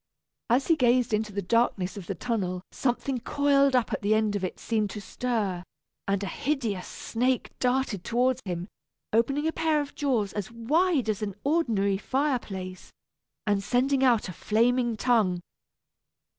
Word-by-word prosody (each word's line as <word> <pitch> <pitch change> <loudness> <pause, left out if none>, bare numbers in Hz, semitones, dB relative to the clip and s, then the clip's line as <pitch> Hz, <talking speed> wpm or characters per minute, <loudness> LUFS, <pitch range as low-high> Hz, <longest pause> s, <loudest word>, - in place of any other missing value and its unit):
As 250 +4 +3
he 330 - +4
gazed 245 -4 +3
into 215 0 0
the 200 0 -3
darkness 195 -2 +1
of 195 -4 -8
the 195 - -3
tunnel 185 -4 -2
something 255 +1 -1
coiled 280 +1 +3
up 245 -2 +1
at - - -2
the 210 +1 +3
end 215 -1 +1
of 200 - -2
it 185 - -3
seemed 215 -3 0
to 210 - -6
stir, 205 -4 -2 0.5
and 200 0 0
a - - -2
hideous 230 -8 -2
snake 250 +2 -1
darted 250 -7 0
toward 250 +2 +1
him, 180 -2 -4 0.5
opening 275 +7 +2
a - - +1
pair 320 -2 +2
of 290 -1 -4
jaws 240 -9 0
as 205 -3 -4
wide 280 +5 +1
as 215 -2 -1
an 200 -3 -3
ordinary 225 -11 +1
fireplace, 215 -10 -2 0.5
and 205 -2 +2
sending 260 +4 +2
out 240 -5 +3
a 185 - -6
flaming 235 +4 +1
tongue. 215 -7 +2
230 Hz, 160 wpm, -27 LUFS, 200-260 Hz, 0.5 s, he